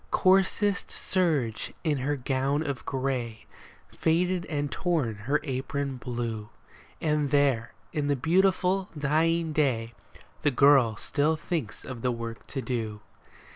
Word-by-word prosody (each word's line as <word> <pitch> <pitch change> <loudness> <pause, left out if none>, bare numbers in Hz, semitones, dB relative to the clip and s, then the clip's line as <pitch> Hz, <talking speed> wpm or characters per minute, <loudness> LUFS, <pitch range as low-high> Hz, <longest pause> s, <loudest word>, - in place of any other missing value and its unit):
Coarsest 195 +1 +3
serge 150 - 0
is 150 -5 +1
her 145 +3 0
gown 135 +3 0
of 140 -3 -4
gray, 130 -4 -2 0.4
Faded 175 +2 +1
and 145 -2 -2
torn 160 -11 0
her 115 +8 0
apron 135 0 -3
blue, 120 -4 -4 0.5
And 150 -2 +1
there 135 -5 +2 0.2
in 150 -2 0
the 145 - +2
beautiful, 185 +5 +2
dying 160 +3 +1
day 120 -6 +1 0.5
The 145 - +3
girl 135 -4 +5
still 155 +1 +1
thinks 155 -7 -4
of 125 -3 -7
the 125 - +1
work 115 -1 -6
to 135 -2 -4
do. 110 -5 -3
140 Hz, 130 wpm, -28 LUFS, 125-160 Hz, 0.5 s, girl